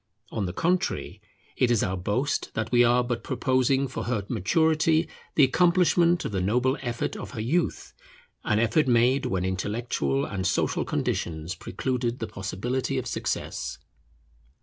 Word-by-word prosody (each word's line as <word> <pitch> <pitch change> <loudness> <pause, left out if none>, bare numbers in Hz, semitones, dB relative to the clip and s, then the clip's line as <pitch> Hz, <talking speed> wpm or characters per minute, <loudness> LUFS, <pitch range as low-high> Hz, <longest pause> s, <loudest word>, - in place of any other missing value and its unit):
On 105 -4 -2
the - - -3
contrary, 180 - -1 0.3
it 125 - +2
is 120 -3 +3
our 95 - -1
boast 105 +10 -1
that 110 0 -2
we 120 -1 +6
are 120 +1 +4
but 120 -1 -3
proposing 130 +1 +1
for 130 - -5
her 115 -5 -1
maturity 160 - +2 0.3
the 150 - +6
accomplishment 175 +3 +3
of - - -2
the 95 -2 -1
noble 125 +7 +2
effort 120 -3 -3
of - - -7
her - - -5
youth, 175 - -1 0.5
an 105 - +1
effort 115 +7 +2
made 125 +2 +3
when 95 -1 -1
intellectual 95 - -1
and 95 -1 -2
social 100 - 0
conditions 80 +1 -2
precluded 120 +6 -2
the 115 - -3
possibility 110 +7 -3
of 130 - -2
success. 120 - -3
120 Hz, 150 wpm, -26 LUFS, 105-135 Hz, 0.5 s, we